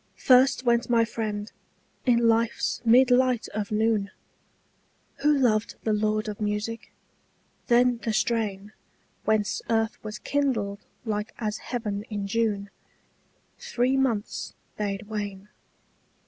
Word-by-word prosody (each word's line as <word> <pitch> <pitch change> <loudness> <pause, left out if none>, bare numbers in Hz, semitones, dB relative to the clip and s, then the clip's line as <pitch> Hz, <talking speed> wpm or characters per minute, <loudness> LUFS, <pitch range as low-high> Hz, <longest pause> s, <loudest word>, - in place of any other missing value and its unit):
First 255 0 +4
went 235 0 +2
my 230 -1 +4
friend, 215 -2 -4 0.6
in 235 -1 +4
life's 230 0 +1
mid 245 +2 +5
light 250 -2 +3
of 210 -1 -4
noon, 215 -2 +1 1.1
Who 300 - +3
loved 235 -7 +2
the 220 - +1
lord 215 0 0
of 210 0 -6
music: 210 +2 -3 0.8
then 245 0 +4
the 230 - -2
strain 215 -2 -1 0.5
Whence 215 -2 +1
earth 225 -1 0
was 215 0 -6
kindled 225 -9 -1 0.2
like 210 +1 -3
as 215 -2 -3
heaven 215 -5 -3
in 205 -2 -3
June 205 -1 -1 0.9
Three 265 - 0
months 240 -6 -1 0.2
bade 200 -1 -3
wane. 205 -2 -5
220 Hz, 120 wpm, -26 LUFS, 210-240 Hz, 1.1 s, mid